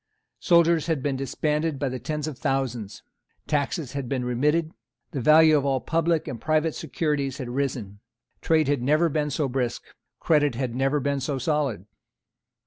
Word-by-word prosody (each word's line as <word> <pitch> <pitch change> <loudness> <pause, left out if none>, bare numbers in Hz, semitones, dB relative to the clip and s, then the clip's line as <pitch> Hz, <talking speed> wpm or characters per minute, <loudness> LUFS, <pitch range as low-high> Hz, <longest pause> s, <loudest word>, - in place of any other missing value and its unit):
Soldiers 170 -2 +3
had 155 -6 -1
been 140 -2 0
disbanded 150 +3 -1
by 135 -2 -2
tens 150 +5 -3
of 155 - -5
thousands. 125 -7 -3 0.4
Taxes 145 -1 -1
had 140 -3 -4
been 130 -3 -1
remitted. 150 +7 +1 0.4
The 140 -6 -3
value 155 +3 +6
of 145 - +2
all 135 -1 +1
public 165 +2 0
and 115 - -6
private 155 0 +1
securities 140 -2 -2
had 130 -4 -5
risen. 120 -6 -3 0.4
Trade 160 -3 +2
had 145 -3 +1
never 155 +6 +3
been 150 0 -1
so 145 0 -1
brisk. 125 -2 -2 0.4
Credit 145 -5 +2
had 125 -1 -2
never 135 +3 +1
been 140 0 -1
so 135 +1 -2
solid. 135 - -1
140 Hz, 160 wpm, -25 LUFS, 130-155 Hz, 0.4 s, value